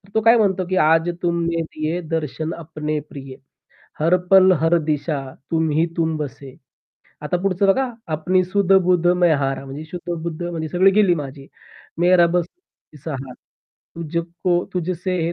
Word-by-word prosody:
तो 220 - +3
काय 230 +2 +6
म्हणतो 190 -4 +1
की 185 - 0
आज 165 +2 +3
तुमने 170 -1 0
दिये, 155 +1 -3
दर्शन 160 0 -3
अपने 155 -2 -4
प्रिये. 135 -2 -9 0.6
हर 165 +4 +3 0.2
पल, 190 -1 +7
हर 165 +1 +3
दिशा 150 -1 -1 0.3
तुम्ही 160 0 +1
तुम 160 -1 0
बसे. 140 -2 -7 0.7
आता 150 +4 -1
पुढचं 195 0 +1
बघा 260 +7 +2 0.3
अपनी 185 +4 +1
सुध 195 +1 +1
बुध 175 -1 +2 0.2
मैं 175 -2 +5
हारा 135 -1 -2
म्हणजे 140 +3 -8
शुद्ध-बुद्ध 170 -2 -5
म्हणजे 165 -2 -4
सगळी 185 +5 +4
गेली 200 -3 +4
माझी, 140 -3 -7 0.5
मेरा 175 0 +5
बस 170 0 0
तूही 270 - -23
सहारा 135 -4 -5 0.6
तुझ 170 0 -3 0.3
को 175 -1 +2
तुझसे 180 +1 -2
170 Hz, 150 wpm, -21 LUFS, 155-180 Hz, 0.7 s, पल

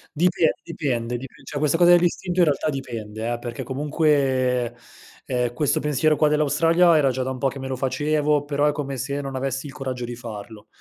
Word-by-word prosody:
Dipe 170 0 +2
dipende 125 -8 -2
dipe 130 +1 -10
cioè, 145 - -5
questa 150 +2 +2
cosa 175 0 +6
dell'istinto 175 +1 +2
in 175 - +6
realtà 150 0 0
dipende, 115 -5 -5
eh, 120 - -2
perché 120 +1 -6
comunque, 130 -3 +1 0.5
ehm, 125 -1 -1
questo 145 +3 +1
pensiero 150 +2 +2
qua 150 - +3
dell'Australia 165 +3 +4
era 140 -3 +3
già 130 +1 -3
da 130 - -2
un 130 - -4
po' 135 - +1
che 135 +1 -4
me 135 - -5
lo 130 - -2
facevo, 145 +2 +1
però 145 0 0
è - - +3
come 140 -2 -4
se 140 +3 -3
non 135 -1 -6
avessi 135 +1 -3
il 140 - -10
coraggio 130 -4 -4
di 120 0 -6
farlo. 110 -2 -9
135 Hz, 205 wpm, -23 LUFS, 125-150 Hz, 0.5 s, cosa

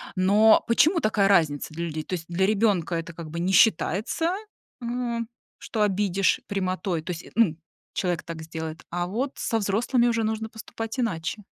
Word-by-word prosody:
Но 205 +4 +5
почему 320 +9 +4
такая 215 -4 +2
разница 155 -5 +2
для 170 +2 -3
людей? 155 -1 -4
То 185 - -7
есть 165 - -7
для 185 +2 +1
ребёнка 200 -5 +1
это 165 0 -4
как 165 -1 -8
бы 170 - -4
не 185 +2 0
считается, 225 - +3 0.5
м, 235 -1 -2 0.3
что 220 - -3
обидишь 195 -1 +1
прямотой, 185 -3 -1
то 180 - -5
есть, 175 -1 -6
м, 170 -9 +4 0.4
человек 180 -3 -1
так 165 -1 -7
сделает. 160 0 -6
А 175 0 -1
вот 255 +8 -2
со 225 - 0
взрослыми 235 +5 +2
уже 230 -1 0
нужно 220 0 -2
поступать 225 +2 -6
иначе. 205 -2 -2
195 Hz, 170 wpm, -25 LUFS, 170-225 Hz, 0.5 s, Но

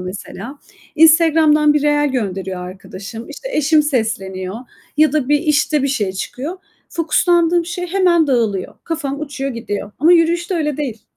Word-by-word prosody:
mesela. 205 +8 -8 0.4
Instagram'dan 315 -2 +5
bir 295 - +1
reel 295 0 +2
gönderiyor 190 -6 -3
arkadaşım. 195 +4 -9
İşte, 475 +12 -8
eşim 305 - +3
sesleniyor 195 -8 -2 0.4
ya 310 -1 +4
da 295 -4 0
bir, 295 0 +4
işte, 300 -2 +1
bir 275 - +1
şey 210 -8 -1
çıkıyor. 265 - -5 0.3
Fokuslandığım 340 +1 +2
şey 355 +1 -4
hemen 350 -3 +3
dağılıyor. 225 -8 0
Kafam 290 -4 -3
uçuyor 280 -2 -4
gidiyor 215 -4 -5
ama 320 +5 +5
yürüyüşte 345 +2 +2
öyle 300 -4 -1
değil. 245 -8 -4
295 Hz, 145 wpm, -18 LUFS, 225-325 Hz, 0.4 s, Instagram'dan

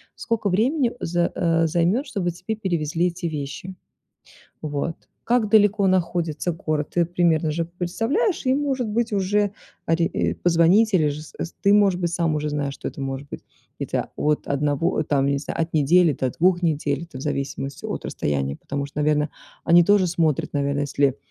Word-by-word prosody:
Сколько 225 -3 -1
времени 245 - +2
з 175 0 0
э, 165 -2 +2
займёт, 175 - +1
чтобы 195 -8 -2
тебе 185 +6 -5
перевезли 170 -4 0
эти 175 0 -5
вещи. 150 +4 -5 0.9
Вот. 150 +2 -3 0.3
Как 235 -3 +1
далеко 205 -2 +4
находится 175 -3 0
город, 155 -2 -3
ты 175 - +3
примерно 165 -2 +1
же 165 +2 -1
представляешь, 225 - -1
и, 255 - +3
может 270 -4 -1
быть, 230 +1 -1
уже 205 +1 +1 0.4
ори 165 +1 +2
и - - -1
позвонить, 175 +6 +3
или 155 -5 +4
же 145 +1 -5
з - - -14
эс 165 - -5
ты, 200 +1 +5
может 200 -3 +4
быть, 170 -1 -1
сам 165 -3 +1
уже 150 0 -1
знаешь, 145 -2 -2
что - - -6
это - - -7
может 135 +1 -4
быть. - - -8 0.4
Это, - - -2
вот, 150 0 0
1, 145 +4 0
там, 140 -2 +1
не 140 0 +1
знаю, 150 - -6
от 165 +1 -3
недели 160 +2 +4
до 130 -1 -1
2 180 +5 +2
недель, 150 -2 0
это 130 - -11
в - - -7
зависимости 140 -1 -4
от - - -4
расстояния, 70 -1 -2
потому 140 0 -4
что, 145 +1 -7
наверное, 150 0 +2 0.3
они 170 +1 +6
тоже 200 +1 +4
смотрят, 165 -5 0
наверное, 140 0 0
если 140 -1 +1
170 Hz, 180 wpm, -23 LUFS, 150-190 Hz, 0.9 s, они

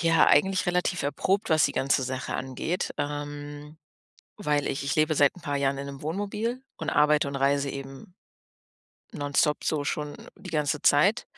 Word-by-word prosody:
ja, 165 -1 +4
eigentlich 190 +6 +3
relativ 180 0 0
erprobt, 190 +8 0
was 155 -2 +5
die - - +1
ganze 135 0 +1
Sache 130 +1 -4
angeht, 135 +7 -3
ähm, 145 +1 -5 0.6
weil 150 -8 0
ich 140 - -3
ich 140 - 0
lebe 155 0 +2
seit 145 +1 +3
'n 180 - -12
paar 145 -3 -2
Jahren 140 0 0
in 140 - -5
'nem 140 0 -8
Wohnmobil 205 - -3
und 160 - -3
arbeite 150 -1 +3
und 140 - -4
reise 140 +1 +1
eben 135 +5 -9 1.0
nonstop 145 +1 0
so 150 -2 0
schon 150 0 -3 0.2
die 190 - -10
ganze 150 -1 -1
Zeit. 195 +11 +4
145 Hz, 170 wpm, -27 LUFS, 140-165 Hz, 1.0 s, was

